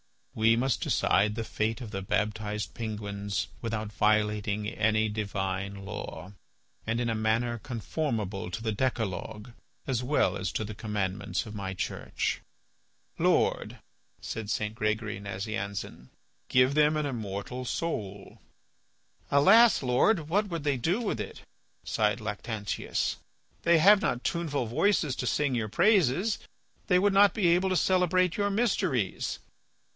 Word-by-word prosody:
We 115 -2 +4
must 125 +2 0
decide 105 +2 +2
the 115 - -2
fate 110 0 -2
of 115 -5 -7
the 95 -2 -3
baptized 105 +1 -2
penguins 100 -5 -4
without 110 -2 -3
violating 105 -1 +1
any 110 0 +1
divine 100 -2 -3
law, 100 -3 -7 0.5
and 115 +1 0
in 120 -1 0
a - - +1
manner 115 +2 0
conformable 110 - -3
to 110 +5 -5
the 110 - 0
decalogue 110 -1 -3 0.3
as 130 -3 -1
well 140 +4 +1
as 95 -1 -3
to - - -1
the 105 0 -6
commandments 100 -3 -2
of 105 - -8
my 95 -2 -4
Church." - - -2 0.8
"Lord," - - +1 0.4
said 110 -2 -5
St. 105 0 -1
Gregory 110 -1 -2
Nazianzen, 100 - -5 0.4
"give 125 +2 +4
them 150 +1 +4
an 150 - 0
immortal 115 -1 -4
soul." 100 - -4 0.9
"Alas! 200 +9 +6
Lord, 150 - +2
what 205 +5 +2
would 170 -5 -4
they 145 -2 +1
do 175 - 0
with 220 - -2
it," - - -6 0.4
sighed 110 +1 0
Lactantius. 105 0 -3 0.4
"They 170 0 +4
have 200 +5 +6
not 120 - -1
tuneful 150 -7 -1
voices 150 - +1
to 125 - -2
sing 145 0 +1
your 115 -3 -1
praises. 195 - +3 0.5
They 180 - +4
would 200 +2 +3
not 200 +1 +6
be 195 -6 +3
able 180 +3 +3
to 185 - +1
celebrate 185 -1 +2
your 205 -1 +1
mysteries." 195 - 0
110 Hz, 140 wpm, -29 LUFS, 105-150 Hz, 0.9 s, Alas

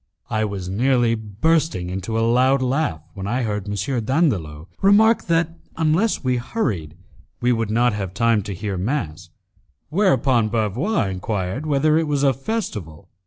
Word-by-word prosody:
I 110 -1 +1
was 100 -3 -5
nearly 120 +4 +2
bursting 110 - 0
into 95 +4 -3
a 115 - +2
loud 130 +3 +3
laugh, 130 - -1
when 95 -1 -6
I 120 +4 0
heard 105 -2 -3
M. 110 +5 -2
Dandolo 100 - 0
remark 215 +4 +5
that, 165 0 +1 0.2
unless 165 +7 +1
we 125 -1 +1
hurried, 100 - -3 0.4
we 125 +1 +2
would 115 -3 0
not 120 +2 +2
have 95 -2 -4
time 115 -1 +2
to 100 - -4
hear 100 0 -4
mass, 90 - -3 0.6
whereupon 135 - +2
Bavois 115 - 0
enquired 95 +7 -3
whether 150 +2 +3
it 165 - -1
was 145 -1 0
a 135 -1 +4
festival. 105 - -5
115 Hz, 155 wpm, -21 LUFS, 100-150 Hz, 0.6 s, remark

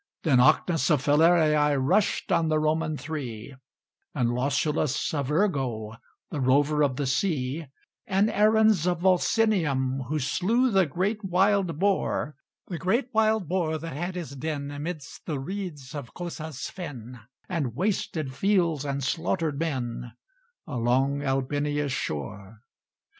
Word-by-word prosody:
Then 140 -7 +4
Ocnus 160 +6 +3
of 150 -5 +2
Falerii 150 -1 +4
Rushed 145 +10 +1
on 165 - +3
the 155 - +2
Roman 155 0 0
Three; 135 -6 -6 0.6
And 120 -2 +1
Lausulus 140 +3 0
of 140 -3 -1
Urgo, 135 - 0 0.4
The 145 - -3
rover 145 +4 +3
of 140 -3 +2
the 140 - -2
sea; 140 0 -1 0.4
And 195 0 +3
Aruns 215 -4 +4
of 175 -1 0
Volsinium, 170 - +2
Who 155 +3 -1
slew 225 - +1
the 190 -4 +3
great 200 +8 -1
wild 190 -2 +2
boar, 190 -6 0 0.3
The 170 -3 -5
great 235 +7 0
wild 220 -4 +2
boar 165 -2 0
that 165 -2 -7
had 175 +4 -3
his 170 -7 -5
den 145 0 -4
Amidst 150 +1 -7
the 150 - -1
reeds 150 -5 -6
of 140 -6 -7
Cosa's 160 -5 -5
fen, 130 - -8 0.3
And 145 - -2
wasted 160 -5 -1
fields, 170 -2 +1
and 140 -1 -3
slaughtered 160 +1 -1
men, 125 -7 -3 0.5
Along 135 0 +1
Albinia's 145 +1 -1
shore. 100 - -5
150 Hz, 130 wpm, -26 LUFS, 135-180 Hz, 0.6 s, Then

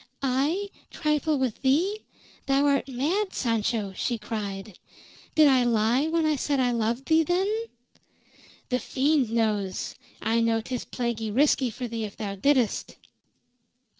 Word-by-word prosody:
"I 295 +10 0 0.2
trifle 305 0 0
with 260 -4 -2
thee? 340 +11 +1 0.4
Thou 275 +1 +3
art 280 -2 +2
mad, 325 +11 -1
Sancho!" 225 -4 -1
she 240 +4 -1
cried. 210 -3 -6 0.6
"Did 310 -1 +7
I 260 -3 +5
lie 240 +4 +2
when 325 0 +1
I 310 -1 +2
said 280 +1 0
I 250 -1 +2
loved 235 +3 -1
thee, 320 0 +5
then?" 355 +4 +1 1.2
"The 250 -1 +1
fiend 275 -2 +1
knows! 215 -4 -1 0.3
I 225 +2 +1
know 230 0 +2
'tis 245 +2 -5
plaguey 235 -3 -3
risky 265 +2 +3
for 245 +2 -5
thee 230 -1 -4
if 205 - -9
thou 205 -3 -4
didst!" 250 +2 +1
255 Hz, 140 wpm, -26 LUFS, 225-290 Hz, 1.2 s, Did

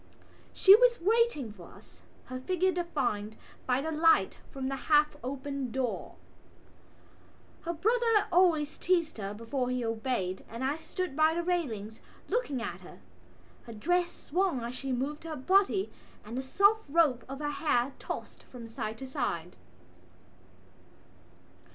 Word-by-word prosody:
She 390 +1 +8
was 485 +1 +4
waiting 400 - +1
for 180 -5 -13
us, - - -18 0.2
her 255 0 -6
figure 370 +7 +1
defined 250 - -2 0.3
by 255 +1 +2
the 320 +2 -3
light 315 - +3
from 265 -1 -4
the 270 - -2
half 300 +2 +3
opened 270 -1 -4
door. 255 -3 -3 1.5
Her 340 - -1
brother 445 +4 +2
always 335 -4 +3
teased 340 -8 +1
her 200 0 -4
before 245 +3 -2
he 250 -1 -1
obeyed 220 -5 -2
and 230 +3 -6
I 280 +3 0
stood 325 -1 -4
by 315 +1 +4
the 345 - -1
railings 230 - -2 0.3
looking 295 - -1
at - - -5
her. - - -13 0.7
Her 230 - -7
dress 345 +10 +1
swung 350 -5 -1
as 235 +1 -4
she 270 +1 -4
moved 275 +5 -2
her 325 -1 -5
body 385 +7 +2 0.3
and 220 +3 -7
the 260 - -1
soft 400 +11 +3
rope 285 -6 +3
of 270 - -5
her 295 0 -2
hair 275 -4 +1
tossed - - -6
from 240 -3 -11
side 220 -1 -5
to 265 - -7
side. 240 - -3
280 Hz, 145 wpm, -30 LUFS, 245-345 Hz, 1.5 s, She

